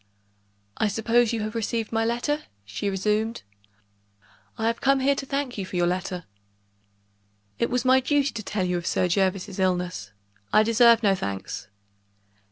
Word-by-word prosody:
"I 215 - +2
suppose 230 +3 +2
you 230 -2 -2
have 215 +1 -3
received 225 -1 -2
my 225 0 +1
letter?" 240 +6 -1 0.2
she 105 - -3
resumed. 210 - -1 1.1
"I 220 - -2
have 230 0 0
come 275 0 +3
here 275 +2 +3
to 275 0 -5
thank 275 -5 -2
you 195 - -3
for - - -8
your 175 -1 +2
letter." 180 0 -2 1.4
"It 235 - +1
was 250 +1 -1
my 260 +1 +6
duty 280 +1 +1
to 225 - -5
tell 200 -2 -2
you 180 -1 0
of 170 - -7
Sir 180 - +1
Jervis's 190 +1 0
illness; 180 - -1 0.4
I 215 - +6
deserve 230 +1 +5
no 200 -2 +4
thanks." 100 - -5
215 Hz, 165 wpm, -25 LUFS, 185-240 Hz, 1.4 s, my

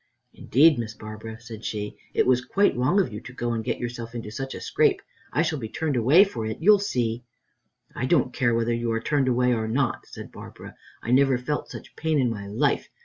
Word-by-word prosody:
"Indeed, 145 +2 +4
Miss 110 -1 -5
Barbara," 110 +1 -9
said 115 -1 -10
she, 105 -1 -4 0.2
"it - - +3
was 125 -1 +3
quite 200 +9 +2
wrong 130 +11 +2
of 130 - 0
you 105 - -6
to 130 - -11
go 120 -1 -2
and 115 -1 -2
get - - -2
yourself 120 -1 -6
into 110 -2 -6
such 135 +4 -5
a - - -6
scrape. - - +2 0.3
I 155 - +2
shall 155 -3 -1
be 110 -3 -5
turned 155 +3 -2
away 135 - +6
for 155 - -4
it, 110 - -4
you'll 205 +4 +6
see." 120 - -1 0.7
"I 130 - -2
don't 130 -5 +2
care 120 -2 +1
whether 115 0 +1
you 115 0 -1
are 115 - 0
turned 140 +2 0
away 125 0 +2
or 110 -1 -1
not," 125 +2 -1
said - - -10
Barbara; - - -11 0.3
"I 115 - -3
never 135 0 +4
felt 145 +4 -3
such - - -10
pain 160 -1 0
in 125 -3 +2
my 100 -2 -6
life. 100 - 0
120 Hz, 225 wpm, -25 LUFS, 115-135 Hz, 0.7 s, away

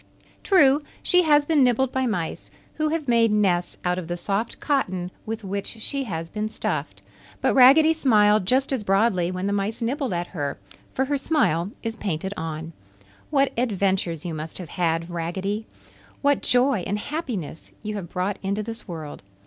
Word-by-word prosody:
True, 295 -7 +5 0.2
she 360 - +5
has 295 -3 +4
been 300 -3 +4
nibbled 250 +1 +2
by 260 -1 0
mice, 180 -8 -3 0.2
who 310 0 0
have 310 -2 -2
made 230 -2 +4
nests 185 -4 +1
out 180 +1 +1
of 170 - -7
the 175 0 -3
soft 200 +5 -2
cotton 185 - -1 0.2
with 225 0 -4
which 200 +1 -3
she 275 +4 -2
has 165 -6 -4
been 215 +4 -3
stuffed, - - -4 0.4
but - - +2
Raggedy 280 +5 +7
smiled 210 - +3
just 265 +4 +2
as 250 -5 -1
broadly 195 -3 +2
when 185 +1 -3
the 200 - 0
mice 205 +4 -1
nibbled 260 +3 -1
at 175 -1 -1
her, 145 -6 -4 0.4
for 265 - +1
her 285 +1 -1
smile 200 - +1
is 225 -1 -3
painted 190 -1 -3
on. 160 0 -5 0.6
What 275 -2 +2
adventures 190 -8 0
you 170 - -3
must 155 +1 -6
have 180 -4 -6
had, 165 -2 0
Raggedy! 190 +5 -3 0.6
What 285 0 +3
joy 250 -1 +3
and 205 +2 -1
happiness 225 - -5
you 215 0 -3
have 195 -5 -5
brought 190 +2 -2
into 200 +2 -1
this 225 +2 -7
world! 160 -5 -7
210 Hz, 175 wpm, -24 LUFS, 180-260 Hz, 0.6 s, Raggedy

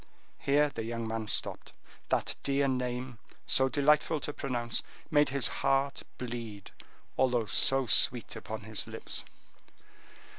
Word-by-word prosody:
Here 145 +1 +2
the 125 -5 -6
young 115 0 -4
man 110 -1 -4
stopped. - - +1 0.4
That - - 0
dear 140 0 +1
name, 125 -2 -3 0.3
so 130 0 +3
delightful 150 +3 +2
to 150 - -4
pronounce, 120 -5 -2 0.3
made 150 -1 +4
his 140 -2 +2
heart 135 0 +1 0.2
bleed, 115 -5 -7 0.5
although 125 -3 +2
so 135 +5 +4
sweet 120 -1 +4
upon 110 0 -7
his 110 +1 -2
lips. - - -4
125 Hz, 125 wpm, -30 LUFS, 115-140 Hz, 0.5 s, made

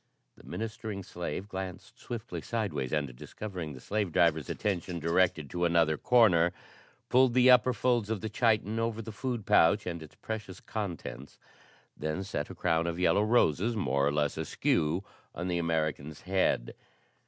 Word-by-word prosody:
The - - -18
ministering 110 -3 -5
slave 90 +2 -5
glanced 95 +5 -7
swiftly 120 -4 -6
sidewise 90 - -2
and, 70 -5 -1
discovering 90 - -6
the 65 - -10
slave 100 +5 -2
driver's 80 -3 +2
attention 90 -3 -2
directed 85 -1 +1
to 90 0 -2
another 85 -2 +3
corner, 90 -5 +4 0.5
pulled 130 -1 +4
the 130 0 +7
upper 125 0 +6
folds 120 -2 +1
of 110 -2 -1
the 110 - -4
chiton 110 -2 +1
over 115 -1 -1
the 110 - -7
food 120 -1 -3
pouch 105 0 +4
and 85 -2 -4
its 80 - -12
precious 105 -4 -6
contents, 80 - -6 0.6
then 80 +5 -3
set - - -4
a - - -8
crown 85 -1 +1
of 85 0 -2
yellow 90 +3 +3
roses 110 -1 +2
more 70 -8 +1
or - - +2
less 75 -1 0
askew 80 +5 0 0.3
on 90 +1 -3
the 85 -1 0
American's 80 -3 -2
head. 95 -10 0
95 Hz, 160 wpm, -30 LUFS, 80-110 Hz, 0.6 s, the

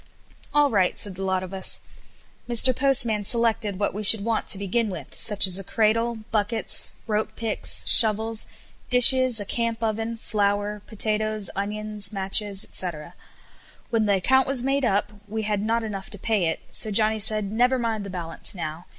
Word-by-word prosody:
"All 290 -1 +2
right," 190 -4 +1
said 205 - -3
the 185 - -10
lot 190 -1 -2
of 185 +1 -9
us. 190 -1 0 0.7
Mr. 240 +2 +3
Postman 240 -6 +2
selected 225 -3 0
what 205 - -1
we 210 - -5
should 210 0 +6
want 230 -1 -2
to - - +5
begin 205 +3 -2
with, 185 - -9
such 205 -3 +3
as 185 0 +3
a - - -8
cradle, 225 +2 -1
buckets, 220 +1 +2
rope 215 0 -3
picks, 225 -2 -2
shovels, 220 0 +4 0.4
dishes, 250 -1 +6
a 205 - -6
camp 230 +1 -3
oven, 225 +1 -3
flour, 205 -1 -2
potatoes, 215 -1 0
onions, 210 0 -3
matches, 195 0 0
&c. 185 - -1 1.0
When 225 -2 0
the 200 - +2
account 265 +7 +1
was 265 -2 0
made 275 0 0
up 205 -1 -1
we 220 +1 -5
had 210 -1 -2
not 225 +2 -1
enough 200 -3 -7
to 205 - -12
pay 205 -2 -1
it; 160 - -3
so 220 - +3
Johnny 215 +1 +2
said, 215 -1 -2
"Never 245 +4 +1
mind 225 -3 -3
the 200 - -8
balance 175 0 -4
now. 165 0 -7
215 Hz, 175 wpm, -23 LUFS, 200-230 Hz, 1.0 s, should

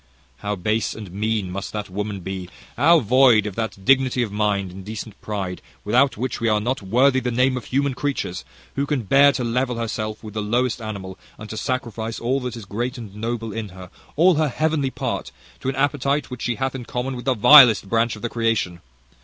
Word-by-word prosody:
"How 105 +4 -3
base 105 +4 -1
and 105 -5 -9
mean 105 -1 -1
must 100 +1 -5
that 105 -1 -4
woman 100 +1 -4
be, 95 -1 -6 0.3
how 170 -1 +5
void 125 -2 +5
of 105 - -4
that 110 -3 -5
dignity 130 -1 +3
of 110 - -4
mind, 100 -2 0
and 95 +1 -10
decent 110 0 -8
pride, 95 -4 -4 0.2
without 125 +5 +3
which 125 +1 -3
we 115 - +1
are 105 -1 +3
not 125 +4 -2
worthy 125 +7 +3
the 125 - -2
name 125 +2 +2
of 125 - -5
human 140 +1 0
creatures, 130 -9 -3 0.3
who 140 +1 -1
can 140 -5 -1
bear 140 +7 +6
to 125 - -2
level 125 +1 -1
herself 110 -1 -4
with 105 -2 -8
the 110 - -2
lowest 120 +3 0
animal, 100 -4 -6 0.2
and 110 0 -9
to - - -5
sacrifice 115 -4 -3
all 130 +4 0
that 125 -2 -5
is 110 - -9
great 120 +6 -3
and 105 -4 -9
noble 115 0 -4
in 110 -2 -4
her, 90 0 -12 0.2
all 180 +5 +5
her 155 -1 +1
heavenly 155 0 0
part, - - -4 0.3
to 130 - -2
an 135 - -3
appetite 140 0 0
which 125 - -7
she 120 - -1
hath 130 +1 -2
in 130 -2 -6
common 125 +3 -3
with 120 -1 -8
the 130 -2 +2
vilest 120 -3 +8
branch 115 +3 +1
of 105 - -13
the 120 - -1
creation! 115 -7 -1
115 Hz, 215 wpm, -22 LUFS, 105-130 Hz, 0.3 s, vilest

